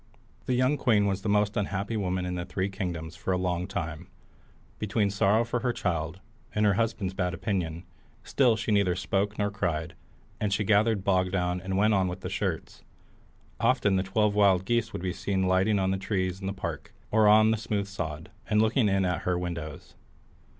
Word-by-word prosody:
The 125 - +1
young 130 +4 +2
queen 110 -7 +3
was 100 -1 -1
the 105 - -2
most 105 0 +2
unhappy 100 +2 -2
woman 95 -3 -1
in 90 - -3
the 90 -1 -3
three 95 +2 -2
kingdoms 85 -5 -5
for 85 - -3
a - - +1
long 90 -1 -1
time, 85 -6 -5 0.7
between 105 -1 0
sorrow 100 +3 +3
for 120 +1 -1
her 120 +1 0
child, 85 -5 -2 0.4
and 105 0 +2
her 100 - +4
husband's 110 -3 -1
bad 90 -2 -1
opinion; 85 -5 -2 0.4
still 125 -5 +3
she 110 0 -3
neither 100 -4 +3
spoke 100 +3 -1
nor 100 -1 0
cried, 85 -5 -2 0.5
and 105 -2 -1
she 100 +2 +1
gathered 105 0 +2
bog 95 -2 +2
down 90 -1 -1
and 95 +1 -2
went 105 +2 +4
on 95 -2 +2
with 90 +1 -5
the - - -5
shirts. - - -3 0.8
Often 115 -4 +2
the 95 - +2
twelve 105 +2 +1
wild 100 -3 +4
geese 115 0 0
would 90 - -6
be 90 -1 -1
seen 95 -1 -1
lighting 95 +3 +2
on 95 -1 +1
the 95 - 0
trees 95 -1 -2
in 95 - -4
the - - -1
park 100 - -6 0.2
or 110 -1 +4
on 110 +1 +6
the 110 - +1
smooth 105 -2 -2
sod, 80 -6 -6 0.2
and 105 - +3
looking 110 +1 +3
in 95 -1 +2
at 90 -1 -1
her 90 -1 0
windows. 85 -4 -6
95 Hz, 200 wpm, -28 LUFS, 90-105 Hz, 0.8 s, on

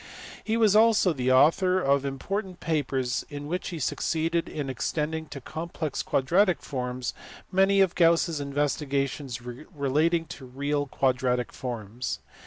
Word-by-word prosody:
He 225 +1 0
was 215 -3 +4
also 215 -5 +5
the 130 -2 0
author 165 +8 +4
of 140 -3 +2
important 185 +7 -4
papers 135 -5 -1
in 145 0 -6
which 180 +5 -3
he 170 - -5
succeeded 165 +3 -1
in 145 -3 -4
extending 155 +4 -2
to 145 - -8
complex 160 +2 -4
quadratic 175 +7 +2
forms 125 -2 -3 0.4
many 195 +1 +4
of 190 -3 +3
Gauss 170 0 +4
s 160 -3 -3
investigations 140 -2 -2
relating 150 +5 -1
to 155 -4 -9
real 145 +3 -2
quadratic 125 -2 0
forms. 120 -1 -4
145 Hz, 135 wpm, -27 LUFS, 130-170 Hz, 0.4 s, also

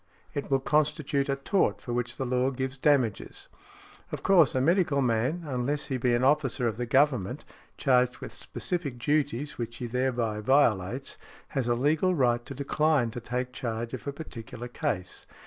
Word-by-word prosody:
It 145 - -4
will 135 -1 +3
constitute 150 0 +1
a 140 - +2
tort 160 +8 +1
for 120 - -5
which 120 0 -2
the 130 - -2
law 125 +1 +1
gives 130 0 -3
damages. 130 -6 0 0.6
Of - - -5
course 175 -9 +5
a - - +3
medical 160 0 +2
man, 130 +7 +1
unless 140 +2 -2
he - - +1
be 120 -1 +2
an 120 - 0
officer 135 -3 +2
of 110 -2 -2
the 120 0 -3
Government, 130 -2 +2 0.3
charged 125 -2 +3
with - - -8
specific 160 -8 -4
duties 145 +1 -1
which 115 0 -4
he 125 - -4
thereby 120 -3 -1
violates, 120 -1 +1 0.3
has 130 -3 -1
a 120 - +2
legal 155 +8 +2
right 120 -4 +2
to 140 - -7
decline 140 -2 +1
to 120 - -6
take 125 +2 -3
charge 115 -1 -4
of 130 - -6
a - - 0
particular 120 -5 -8
case. 120 - -4
130 Hz, 175 wpm, -28 LUFS, 120-145 Hz, 0.6 s, course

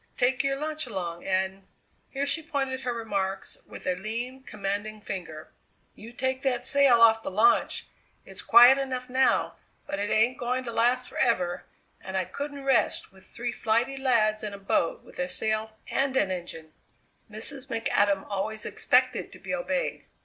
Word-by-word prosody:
Take 260 +2 +2
your 275 0 +1
lunch 310 -1 -4
along 175 -6 -5
and 190 0 -1 0.2
" - - -41
Here 275 +1 -2
she 285 +3 0
pointed 275 -5 -3
her 250 - -2
remarks 200 -5 -3
with - - -10
a 185 - +1
lean, 230 +7 -3
commanding 215 -2 -4
finger: 170 -6 -7 0.4
"You 225 +3 -12
take 260 +1 -2
that 250 -3 0
sail 265 -3 +5
off 225 -1 +6
the - - -4
launch! 215 - +2 0.4
It's - - -7
quiet 245 +3 +8
enough 255 -2 -4
now, 260 +1 +2 0.3
but 195 - -4
it 205 +1 -1
ain't 230 +5 +2
going 250 +1 -1
to 235 - -5
last 245 +2 +2
forever, 180 -8 0 0.4
and 190 0 -4
I 185 - 0
couldn't 285 +3 -6
rest 265 -7 +1
with 190 0 -20
three 240 0 -4
flighty 235 +5 0
lads 225 -5 +2
in 205 -1 -4
a - - -9
boat 195 -4 -1
with - - -15
a 180 0 -1
sail 220 +1 -1
and 270 -1 +1
an 190 - +2
engine." 165 -3 -6 0.6
Mrs. 255 +5 -1
McAdam 205 -5 +1
always 210 +2 -3
expected - - +1
to - - -11
be - - -6
obeyed. - - -2
230 Hz, 170 wpm, -27 LUFS, 195-260 Hz, 0.6 s, quiet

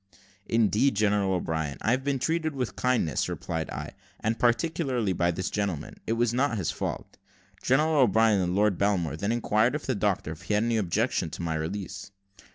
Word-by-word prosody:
"Indeed, 115 +3 +2
General 100 -2 +2
O'Brien, 80 -4 -2
I 110 - +1
have 130 +1 +1
been 140 0 0
treated 160 +2 -1
with 125 -3 -3
kindness," 120 - 0
replied 80 -1 -4
I; - - -5 0.3
"and 110 +1 -1
particularly 125 - +1
by 85 0 +1
this 95 +2 -2
gentleman. 100 -8 -3
It 115 - +1
was 120 0 +1
not 130 -2 +1
his 90 -6 -1
fault." - - -5 0.4
General 150 +4 +2
O'Brien 110 -3 +4
and 90 0 -1
Lord 105 -2 +2
Belmore 90 -7 +1
then 100 +7 -1
inquired 115 +1 +2
of 150 - -4
the 130 - 0
doctor 100 -7 -1
if 80 +1 -9
he 105 +4 -1
had 105 - +2
any 115 -1 +1
objection 105 -2 0
to 80 - -6
my 80 -1 -1
release. 95 +5 -4
105 Hz, 185 wpm, -27 LUFS, 90-125 Hz, 0.4 s, O'Brien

